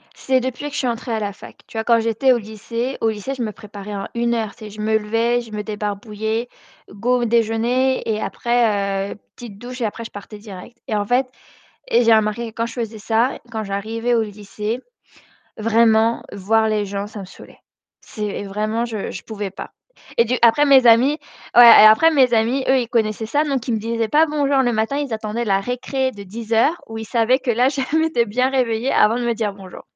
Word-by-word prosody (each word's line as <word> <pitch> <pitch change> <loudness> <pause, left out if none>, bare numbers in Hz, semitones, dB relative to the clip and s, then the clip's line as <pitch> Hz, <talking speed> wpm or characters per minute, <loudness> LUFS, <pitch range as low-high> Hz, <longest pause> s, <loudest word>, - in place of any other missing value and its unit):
C'est 260 -1 +1
depuis 260 +2 -4
que 290 - -8
je - - -4
suis 255 - 0
entrée 235 +1 -3
à 220 - -1
la 205 -1 -3
fac. - - -13
Tu - - -16
vois? 220 - -1
Quand 230 0 +3
j'étais 230 +4 +2
au - - +1
lycée 230 +4 -5
au 225 - +2
lycée, 220 +5 -4
je 260 - -6
me 220 -2 -2
préparais 205 -1 -9
en 195 - -5
1 235 0 0
heure. 220 -3 -2
Tu 215 - -11
sais, - - -8
je 210 +1 -12
me 220 +1 0
levais, 230 +3 0
je 230 -2 -12
me 210 0 -4
débarbouillais, 215 +2 -4 0.4
go 245 +5 0
au - - +1
déjeuner 235 +3 +1
et 215 -1 -1
après, 200 -5 0
heu, - - -6 0.2
petite 225 -5 -10
douche 250 +3 -8
et - - +1
après, 220 +2 -4
je 225 - -9
partais 205 +1 -10
direct. 205 +2 -11
Et 215 - -1
en 205 -1 0
fait, 250 +4 +1 0.6
et 240 +1 +4
j'ai 230 -1 +5
remarqué 220 +2 0
que 220 - -18
quand 230 - -1
je 235 - -7
faisais 230 -2 -5
ça, 225 +4 0
quand 220 -1 -3
j'arrivais 220 +4 -2
au 225 - +2
lycée, 210 +2 -5 0.8
vraiment, 225 +1 +3
voir 220 +3 +1
les 210 -1 0
gens, 200 +1 -4
ça 210 - -10
me - - -7
saoulait. 185 - -15 0.4
C'est 210 -1 -5
vraiment, 215 +3 -2
je 220 -4 -4
je 175 - -8
pouvais 205 -3 -5
pas. 195 - -9 0.4
Et 235 - +5
du 240 +2 -1
après 235 +5 +5
mes 270 -3 +6
amis, 250 +6 +5 0.4
ouais, 245 - +10 0.2
et - - +10
après 220 +10 +6
mes 260 -5 +4
amis, 235 +4 +1
eux, 265 - +4
ils 240 -2 -2
connaissaient 220 -2 -1
ça, 290 +7 +1
donc 275 -5 -2
ils 235 - +1
me - - 0
disaient 230 0 -2
pas 310 +5 +4
bonjour 285 -2 +1
le 250 -2 +2
matin, 220 +5 -1
ils 285 -4 -3
attendaient 220 +2 -3
la 195 -3 +1
récré 255 +4 -2
de 205 - -10
10:00 225 - 0
où 225 0 -7
ils 220 - -5
savaient 235 +3 +2
que 255 - -1
là, 245 +3 +3
je 275 0 -3 0.2
m'étais 320 -8 +1
bien 250 +5 +1
réveiller 250 -2 0
avant 215 +2 +4
de 245 - -2
me 235 -1 0
dire 215 -2 -2
bonjour. 195 -2 -12
225 Hz, 230 wpm, -20 LUFS, 215-245 Hz, 0.8 s, ouais